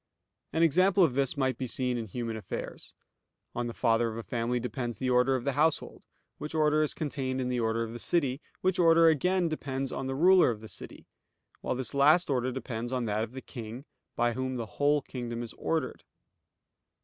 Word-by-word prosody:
An 165 - +2
example 185 +4 +4
of 155 -7 +3
this 135 +1 0
may 130 -1 +2
be 130 +1 -5
seen 125 +1 0
in 115 -2 -3
human 115 +2 -4
affairs. 110 - -6 0.6
On 120 0 -2
the - - -3
father 115 -1 +2
of 110 - -6
a 115 - -5
family 120 +1 -1
depends 120 -1 -4
the 130 +2 -1
order 125 +2 +4
of 125 - -2
the 140 - 0
household; 155 +3 0 0.3
which 150 +2 -6
order 155 0 +3
is 155 - 0
contained 135 -4 -3
in 125 -1 -1
the 125 -1 0
order 115 0 0
of 115 0 -6
the 120 - -7
city; 140 +1 0 0.2
which 185 0 +1
order 165 -1 +6
again 180 +3 +2
depends 135 -4 -3
on 135 - -4
the 135 - -2
ruler 180 +3 +6
of 115 -3 -3
the 110 - -10
city; - - -9 0.5
while - - -2
this 130 -1 -3
last 150 +4 +4
order 130 -1 0
depends 120 -2 -5
on 125 -2 -1
that 105 0 0
of 115 +2 -7
the 130 - -7
king, 120 +1 -8 0.3
by 120 0 +1
whom 130 +1 -3
the 120 -2 -3 0.2
whole 145 0 +3
kingdom 120 -3 -5
is 115 - -8
ordered. 160 -6 -2
130 Hz, 210 wpm, -29 LUFS, 120-150 Hz, 0.6 s, order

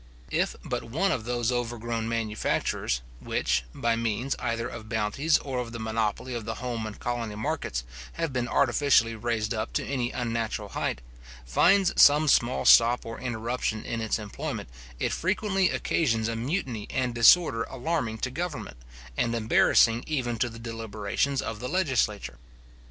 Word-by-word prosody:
If - - 0
but - - -3
one 165 +12 0
of 115 -9 -2
those 120 0 0
overgrown 115 -2 -2
manufactures, 110 - -1 0.2
which, 65 -1 0
by 115 - 0
means 115 +3 -1
either 115 0 -2
of 110 -3 -9
bounties 115 +8 +2
or 130 -3 -4
of 120 -1 -5
the 115 - -5
monopoly 110 +2 -2
of 120 -2 -4
the 115 +1 -4
home 120 -3 -4
and 105 - -9
colony 120 -3 -3
markets, 60 - -2 0.3
have 165 -4 -2
been 125 -1 -1
artificially 125 -3 +3
raised 110 0 -1
up 110 -1 -3
to - - -1
any 125 -3 -1
unnatural 115 -2 -2
height, - - -2 0.4
finds 180 - +4
some 150 +2 +7
small 125 -2 +3
stop 120 +1 +6
or 115 0 -6
interruption 120 -2 -2
in 115 -1 -3
its 110 - 0
employment, 105 - -5 0.3
it - - 0
frequently 190 +1 +1
occasions 115 -8 0
a 115 - -2
mutiny 125 - -3
and 125 -2 -1
disorder 120 +1 +6
alarming 130 -4 -2
to 130 +3 -3
government, 155 - -5 0.4
and 115 - 0
embarrassing 115 +1 +4
even 120 -7 -1
to 120 - +1
the 115 - -10
deliberations 115 +3 -2
of 110 -2 -5
the 125 +1 -4
legislature. 130 - 0
115 Hz, 155 wpm, -27 LUFS, 110-130 Hz, 0.4 s, some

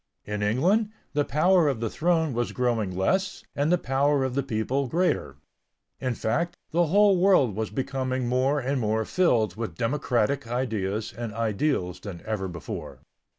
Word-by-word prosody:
In 105 0 -3
England, 175 - +2 0.2
the 145 -1 +2
power 165 +5 +3
of 135 -5 0
the 115 - -1
throne 160 +2 +1
was 120 +1 -2
growing 115 -7 0
less 190 - 0
and 145 +3 +1
the 180 - +5
power 140 -1 +1
of 130 -1 -1
the 140 - +1
people 130 +2 -1
greater. 160 - 0 0.6
In 130 -2 -2
fact, 160 +13 -1 0.2
the 170 +1 +2
whole 200 +3 +5
world 175 - +4
was 110 0 -2
becoming 130 -2 -2
more 130 +4 +2
and 135 0 -1
more 110 0 0
filled 115 - +2
with 110 -8 -4
democratic 125 0 0
ideas 110 -4 -2
and 115 -2 -5
ideals 110 - -1
than 95 -5 -8
ever 105 -3 -2
before. 85 -3 -7
130 Hz, 160 wpm, -26 LUFS, 110-150 Hz, 0.6 s, the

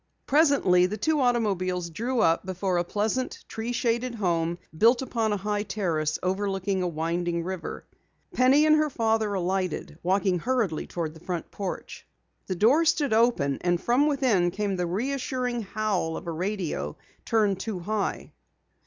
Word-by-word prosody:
Presently 275 - +4
the 210 +3 -4
two 315 +1 +1
automobiles 185 -8 0
drew 235 +8 -1
up 165 0 +3
before 185 0 -1
a - - +1
pleasant, 215 +8 -2
tree 225 +2 -4
shaded 235 0 0
home 170 -4 0 0.2
built 235 +9 +4
upon 225 -4 -1
a 205 - +1
high 205 +1 -1
terrace 175 -7 -1
overlooking 195 0 -1
a 180 - 0
winding 170 +1 -1
river. 185 -1 -5 0.5
Penny 270 +4 +5
and 310 0 +6
her 305 0 +2
father 220 -4 0
alighted, 185 -3 -2
walking 190 0 +1
hurriedly 225 -7 -1
toward 165 -3 -4
the 160 - -13
front 175 -3 -4
porch. 195 -3 -6 0.4
The 185 - -2
door 245 - +4
stood 295 -6 +2
open 220 - +2
and 175 -1 +1
from 250 +9 +2
within 250 -12 +2
came 200 +1 -2
the 180 -1 -1
reassuring 250 +4 -2
howl 200 -5 -1
of - - -8
a 170 - -3
radio 170 - -3 0.3
turned 210 -4 +1
too 210 -1 -3
high. 205 +3 -3
200 Hz, 155 wpm, -26 LUFS, 175-235 Hz, 0.5 s, and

